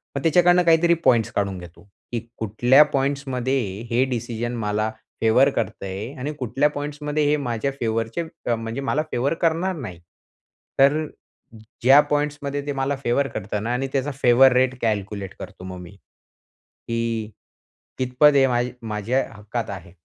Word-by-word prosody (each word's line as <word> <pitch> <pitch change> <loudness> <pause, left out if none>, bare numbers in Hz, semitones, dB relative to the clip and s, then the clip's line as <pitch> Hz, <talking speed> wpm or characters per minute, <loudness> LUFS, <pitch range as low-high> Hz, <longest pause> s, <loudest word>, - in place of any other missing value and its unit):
मग 140 - -2
त्याच्याकडून 175 +2 +4
काहीतरी 170 +1 +5
पॉईंट्स 115 -3 +3
काढून 100 -2 -1
घेतो. 85 +1 -13 0.3
की 120 - -1 0.2
कुठल्या 120 +6 +5
पॉईंट्स 140 +1 0
मध्ये 130 +1 0 0.3
हे 120 +2 +2
डिसिजन 120 0 -3
मला 105 +1 0 0.3
फेवर 115 +5 +5
करत 115 - -3
आहे 100 +6 -5
आणि 140 +4 -3
कुठल्या 135 +4 +1
पॉईंट्स 145 0 -6
मध्ये 150 0 0
हे 150 - +3
माझ्या 125 -1 -2
फेवरचे 115 +4 -1 0.3
अ, 120 - +3
म्हणजे 115 +3 -5
मला 140 +2 0
फेवर 130 +5 0
करणार 170 +3 +1
नाही. 110 - -7 0.8
तर 145 +3 +4 0.8
ज्या 135 +4 +7
पॉईंट्स 145 0 0
मध्ये 140 0 -3
ते 145 - -2
मला 135 +1 -1
फेवर 130 +3 +1
करता 105 -3 -4
ना 115 +4 -2
आणि 135 +2 -1
त्याचा 140 +1 0
फेवर 125 +2 +6
रेट 130 0 +2
कॅल्क्युलेट 100 -3 -2
करतो - - -10
मग 95 0 -7
मी. 85 - -11 1.0
की 115 -2 -2 0.7
कितपत 130 +3 +4
हे 135 -1 +6
मा 120 -1 +1 0.3
माझ्या 110 +5 0
हक्कात 110 +2 -5
आहे 90 -4 -8
125 Hz, 160 wpm, -23 LUFS, 110-140 Hz, 1.0 s, ज्या